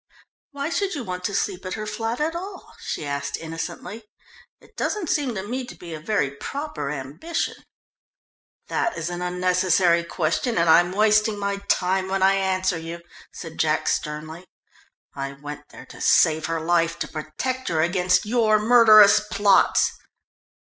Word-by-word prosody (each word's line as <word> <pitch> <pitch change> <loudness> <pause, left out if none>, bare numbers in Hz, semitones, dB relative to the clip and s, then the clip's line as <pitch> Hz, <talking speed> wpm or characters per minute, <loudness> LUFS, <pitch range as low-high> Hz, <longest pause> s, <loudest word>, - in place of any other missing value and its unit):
"Why 285 +2 -4
should 390 0 -1
you 280 - -4
want 180 -3 -5
to 205 - -2
sleep 195 -2 -2
at 185 - -4
her 215 - -5
flat 225 +3 -3
at 320 +2 -1
all?" 375 +2 -8
she 155 - -5
asked 140 0 -3
innocently. 170 +6 -7 0.5
"It - - -22
doesn't 390 -7 -2
seem 275 -6 0
to 190 - -4
me 255 +3 -3
to - - -11
be 170 -2 -9
a 155 - -6
very 155 -4 -1
proper 150 - -5
ambition." 150 - -3 1.1
"That 345 - -1
is 165 +2 -3
an 175 0 -5
unnecessary 180 -1 +2
question, 170 +7 -1
and 170 0 +2
I'm 175 +2 +5
wasting 215 +1 +3
my 200 0 -2
time 190 +1 +1
when 190 0 -1
I 195 +1 +5
answer 185 -2 0
you," 165 +1 -7 0.3
said 165 -2 -10
Jack 155 -1 +1
sternly. 155 +4 -3 0.7
"I 135 0 -5
went 145 +1 -9
there - - -12
to - - -12
save 160 -1 +3
her 165 0 -2
life, 170 0 +1
to - - -4
protect 210 +13 -4
her 165 -3 +1
against 180 +2 +2
your 215 -1 +3
murderous 215 -2 +7
plots!" 205 -1 +3
185 Hz, 160 wpm, -23 LUFS, 165-215 Hz, 1.1 s, murderous